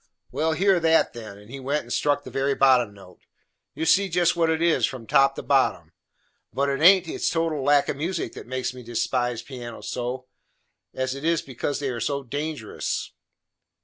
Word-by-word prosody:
"Well, 155 Hz, +5 st, 0 dB
hear 190 Hz, +2 st, +3 dB
that, 165 Hz, 0 st, +3 dB
then," 110 Hz, -4 st, -9 dB
and 105 Hz, +3 st, -15 dB
he 135 Hz, -, -7 dB
went 140 Hz, +3 st, -1 dB
and -, -, -6 dB
struck 145 Hz, -1 st, +1 dB
the -, -, -10 dB
very 135 Hz, +1 st, 0 dB
bottom 130 Hz, -5 st, +4 dB
note. 95 Hz, -3 st, -16 dB, 0.6 s
"You 160 Hz, -, -2 dB
see 195 Hz, +4 st, +4 dB
just 175 Hz, 0 st, +2 dB
what 165 Hz, -1 st, +2 dB
it 160 Hz, 0 st, +1 dB
is, 170 Hz, 0 st, +2 dB
from 125 Hz, -4 st, -8 dB
top 135 Hz, +4 st, +4 dB
to -, -, -6 dB
bottom. -, -, +1 dB, 0.6 s
But 140 Hz, +1 st, 0 dB
it 135 Hz, 0 st, -1 dB
haint 185 Hz, +2 st, +6 dB
its -, -, -1 dB
total 165 Hz, -3 st, -1 dB
lack 145 Hz, +1 st, +4 dB
of -, -, -2 dB
music 160 Hz, -5 st, -3 dB
that -, -, -10 dB
makes 130 Hz, 0 st, -3 dB
me 125 Hz, -, -10 dB
despise 120 Hz, 0 st, -1 dB
pianos 120 Hz, -4 st, -8 dB
so, 125 Hz, +1 st, -4 dB, 0.7 s
it 130 Hz, +2 st, -3 dB
is 165 Hz, 0 st, +1 dB
because 135 Hz, +2 st, -3 dB
they 140 Hz, -2 st, -2 dB
are 120 Hz, -2 st, -4 dB
so 140 Hz, +4 st, -1 dB
dangerous." 145 Hz, -2 st, -4 dB
140 Hz, 190 wpm, -24 LUFS, 125-160 Hz, 0.7 s, haint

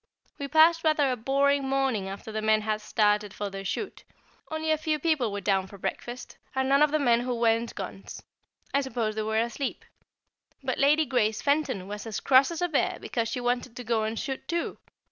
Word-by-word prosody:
We 280 Hz, -, -3 dB
passed 325 Hz, +3 st, +5 dB
rather 305 Hz, -4 st, +3 dB
a -, -, 0 dB
boring 275 Hz, +3 st, +1 dB
morning 265 Hz, -8 st, 0 dB
after 200 Hz, +3 st, -7 dB
the 215 Hz, 0 st, -3 dB
men 215 Hz, 0 st, +3 dB
had 215 Hz, 0 st, -2 dB
started 210 Hz, -1 st, +1 dB
for 205 Hz, -1 st, -4 dB
their 195 Hz, 0 st, -6 dB
shoot. 380 Hz, -, -4 dB, 0.5 s
Only 315 Hz, 0 st, -1 dB
a 310 Hz, -, +3 dB
few 310 Hz, 0 st, 0 dB
people 295 Hz, -7 st, +1 dB
were 200 Hz, 0 st, -4 dB
down 190 Hz, -1 st, +1 dB
for 200 Hz, -, -12 dB
breakfast, 240 Hz, +5 st, -6 dB, 0.2 s
and 265 Hz, 0 st, +1 dB
none 275 Hz, +1 st, +4 dB
of 300 Hz, -, +6 dB
the 310 Hz, -, +1 dB
men 240 Hz, -5 st, +3 dB
who 245 Hz, 0 st, -2 dB
weren't 230 Hz, 0 st, +1 dB
guns. 195 Hz, 0 st, -7 dB, 0.5 s
I 280 Hz, -, +3 dB
suppose 240 Hz, -5 st, -2 dB
they 215 Hz, -, -2 dB
were 220 Hz, +1 st, -1 dB
asleep. 235 Hz, +4 st, -2 dB, 0.8 s
But 260 Hz, -1 st, -2 dB
Lady 300 Hz, +3 st, +4 dB
Grace 220 Hz, -5 st, 0 dB
Fenton 280 Hz, -10 st, 0 dB
was 210 Hz, +2 st, -6 dB
as 215 Hz, -, -3 dB
cross 265 Hz, 0 st, +5 dB
as 335 Hz, +1 st, -3 dB
a -, -, +3 dB
bear 310 Hz, -5 st, 0 dB
because 230 Hz, -2 st, -2 dB
she 250 Hz, -, -3 dB
wanted 245 Hz, 0 st, -1 dB
to 245 Hz, -, -6 dB
go 230 Hz, -1 st, +1 dB
and 220 Hz, +1 st, -2 dB
shoot 270 Hz, +2 st, -4 dB
too. 340 Hz, 0 st, -2 dB
245 Hz, 210 wpm, -27 LUFS, 215-280 Hz, 0.8 s, of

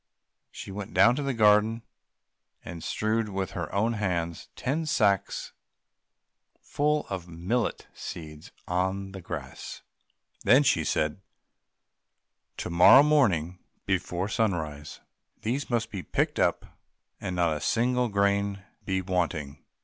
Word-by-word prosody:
She -, -, -9 dB
went 100 Hz, 0 st, -7 dB
down 120 Hz, -, +7 dB
into 135 Hz, +4 st, -2 dB
the 140 Hz, -1 st, -1 dB
garden 110 Hz, +1 st, +4 dB, 0.8 s
and 85 Hz, -1 st, -7 dB
strewed 110 Hz, 0 st, -1 dB
with 95 Hz, -1 st, -3 dB
her 85 Hz, -4 st, -5 dB
own 110 Hz, +4 st, +1 dB
hands 85 Hz, -6 st, -2 dB
ten 155 Hz, +5 st, -2 dB
sacks 100 Hz, -8 st, +1 dB, 1.1 s
full 150 Hz, +1 st, 0 dB
of 90 Hz, -3 st, -5 dB
millet 90 Hz, +8 st, -2 dB
seed 75 Hz, -2 st, -8 dB, 0.2 s
on 95 Hz, +2 st, -1 dB
the 95 Hz, -1 st, -8 dB
grass; 75 Hz, -6 st, -7 dB, 0.6 s
then 130 Hz, +8 st, +6 dB
she 85 Hz, -, +2 dB
said, 75 Hz, +3 st, -1 dB, 1.4 s
"To -, -, -4 dB
morrow 90 Hz, +11 st, +8 dB
morning 95 Hz, -, +2 dB, 0.3 s
before 95 Hz, -1 st, -1 dB
sunrise 80 Hz, -10 st, -2 dB, 0.4 s
these 130 Hz, +6 st, -2 dB
must 115 Hz, -2 st, -1 dB
be 100 Hz, -3 st, -4 dB
picked -, -, -1 dB
up, -, -, +1 dB, 0.5 s
and 90 Hz, -, -4 dB
not 85 Hz, -3 st, +2 dB
a 75 Hz, -, -5 dB
single 125 Hz, +1 st, +1 dB
grain 100 Hz, -1 st, +1 dB, 0.2 s
be 95 Hz, -1 st, -1 dB
wanting." 80 Hz, -6 st, -2 dB
95 Hz, 125 wpm, -27 LUFS, 85-115 Hz, 1.4 s, morrow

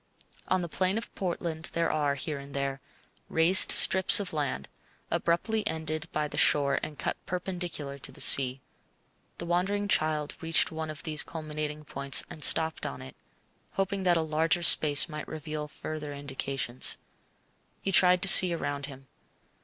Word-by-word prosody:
On 185 Hz, -1 st, -1 dB
the -, -, -5 dB
plain 185 Hz, +4 st, -2 dB
of 230 Hz, -, -8 dB
Portland 170 Hz, -3 st, -4 dB
there 165 Hz, 0 st, -1 dB
are, 145 Hz, -2 st, -2 dB
here 145 Hz, +1 st, -6 dB
and 140 Hz, 0 st, -12 dB
there, 140 Hz, 0 st, -4 dB, 0.5 s
raised 165 Hz, +4 st, +7 dB
strips 190 Hz, +1 st, +5 dB
of 195 Hz, -4 st, -6 dB
land, 140 Hz, -, -4 dB, 0.4 s
abruptly 215 Hz, +6 st, -1 dB
ended 160 Hz, -1 st, -4 dB
by 150 Hz, 0 st, -3 dB
the -, -, -5 dB
shore 140 Hz, -1 st, +2 dB
and 150 Hz, -1 st, -8 dB
cut -, -, -4 dB
perpendicular 175 Hz, -6 st, -6 dB
to -, -, -7 dB
the -, -, -16 dB
sea. 130 Hz, -1 st, +5 dB, 0.8 s
The 170 Hz, -, -7 dB
wandering 190 Hz, +4 st, -2 dB
child 155 Hz, -5 st, -1 dB
reached 165 Hz, +1 st, +1 dB
one 160 Hz, 0 st, -6 dB
of 155 Hz, +1 st, -8 dB
these 155 Hz, -2 st, 0 dB
culminating 155 Hz, -1 st, -6 dB
points 140 Hz, -1 st, -2 dB
and 155 Hz, -, -8 dB
stopped 160 Hz, +2 st, +2 dB
on 65 Hz, -, -9 dB
it, 65 Hz, -, -12 dB, 0.6 s
hoping 195 Hz, 0 st, -3 dB
that 180 Hz, -2 st, +1 dB
a -, -, 0 dB
larger 160 Hz, +2 st, -1 dB
space 150 Hz, -2 st, +6 dB
might 150 Hz, -2 st, -9 dB
reveal 155 Hz, -1 st, -7 dB
further 150 Hz, 0 st, -8 dB
indications. 135 Hz, -2 st, -4 dB, 0.9 s
He 195 Hz, -, -2 dB
tried 180 Hz, -1 st, +3 dB
to -, -, +2 dB
see 185 Hz, -2 st, +9 dB
around 145 Hz, -3 st, -5 dB
him. 135 Hz, -2 st, -14 dB
155 Hz, 160 wpm, -27 LUFS, 145-175 Hz, 0.9 s, see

